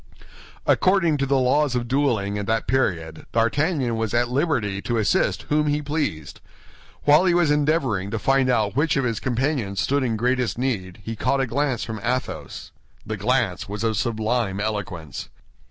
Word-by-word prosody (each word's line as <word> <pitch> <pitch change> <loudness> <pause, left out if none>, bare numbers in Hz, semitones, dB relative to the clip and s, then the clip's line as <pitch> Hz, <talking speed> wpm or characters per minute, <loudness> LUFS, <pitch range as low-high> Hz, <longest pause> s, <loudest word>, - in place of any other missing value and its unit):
According 175 -5 +3
to 135 -1 -1
the 135 0 +2
laws 130 +1 +2
of 120 -1 -1
dueling 115 -7 0
at 100 - -4
that 110 +1 0
period, 85 -11 -1
D'Artagnan 130 +2 +1
was 110 0 -1
at 120 0 +2
liberty 125 - 0
to 120 +2 -1
assist 110 - +1
whom 150 0 +2
he 145 0 +1
pleased. 145 - -3 0.6
While 150 +5 +5
he 175 -2 +3
was 170 -4 +3
endeavoring 145 - +1
to 115 - -2
find 135 +3 +2
out 110 -4 +1
which 150 +2 +2
of 135 - +1
his 115 -4 -1
companions 125 -5 -1
stood 140 +1 +1
in 115 -4 0
greatest 125 +1 0
need, 105 -7 -3
he 115 +3 -5
caught 130 +5 0
a 135 - +2
glance 130 +1 -1
from 110 -2 -5
Athos. 125 +2 -3 0.3
The 110 - -3
glance 110 -3 0
was 105 +1 -4
of 110 -1 +1
sublime 110 -2 -1
eloquence. 100 - -4
120 Hz, 170 wpm, -23 LUFS, 105-140 Hz, 0.6 s, While